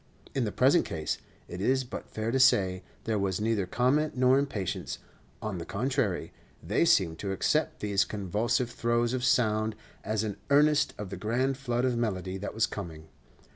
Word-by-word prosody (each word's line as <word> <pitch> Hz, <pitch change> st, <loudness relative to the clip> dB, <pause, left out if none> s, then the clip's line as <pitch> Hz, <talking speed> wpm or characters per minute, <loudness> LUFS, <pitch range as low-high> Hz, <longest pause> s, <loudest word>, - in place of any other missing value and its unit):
In 130 Hz, -3 st, 0 dB
the 105 Hz, -, -2 dB
present 135 Hz, -, +4 dB
case, 80 Hz, -2 st, -3 dB, 0.3 s
it 90 Hz, +2 st, -6 dB
is 130 Hz, +5 st, +2 dB
but 125 Hz, -, -8 dB
fair 110 Hz, +1 st, -3 dB
to 130 Hz, -, +1 dB
say, 95 Hz, -8 st, +4 dB, 0.2 s
there 110 Hz, -2 st, 0 dB
was 95 Hz, -1 st, -1 dB
neither 105 Hz, -3 st, 0 dB
comment 130 Hz, +8 st, +1 dB
nor 130 Hz, +1 st, +5 dB
impatience; 110 Hz, -10 st, -3 dB, 0.5 s
on 105 Hz, -5 st, -3 dB
the -, -, -4 dB
contrary, 125 Hz, -2 st, -1 dB, 0.3 s
they 105 Hz, -, +2 dB
seemed 95 Hz, -, +3 dB
to 100 Hz, -, -3 dB
accept 95 Hz, -, 0 dB
these 100 Hz, -2 st, +2 dB
convulsive 105 Hz, +5 st, -1 dB
throes 120 Hz, 0 st, 0 dB
of 130 Hz, -1 st, -2 dB
sound 110 Hz, -4 st, +2 dB, 0.3 s
as 110 Hz, 0 st, -1 dB
an 105 Hz, -2 st, -3 dB
earnest 150 Hz, +1 st, +4 dB
of 100 Hz, -2 st, -6 dB
the -, -, -5 dB
grand 125 Hz, +5 st, 0 dB
flood 125 Hz, -2 st, -1 dB
of 125 Hz, -2 st, +1 dB
melody 95 Hz, -5 st, -2 dB
that 105 Hz, -, -5 dB
was 110 Hz, -, +3 dB
coming. 80 Hz, -5 st, -7 dB
110 Hz, 175 wpm, -29 LUFS, 100-130 Hz, 0.5 s, nor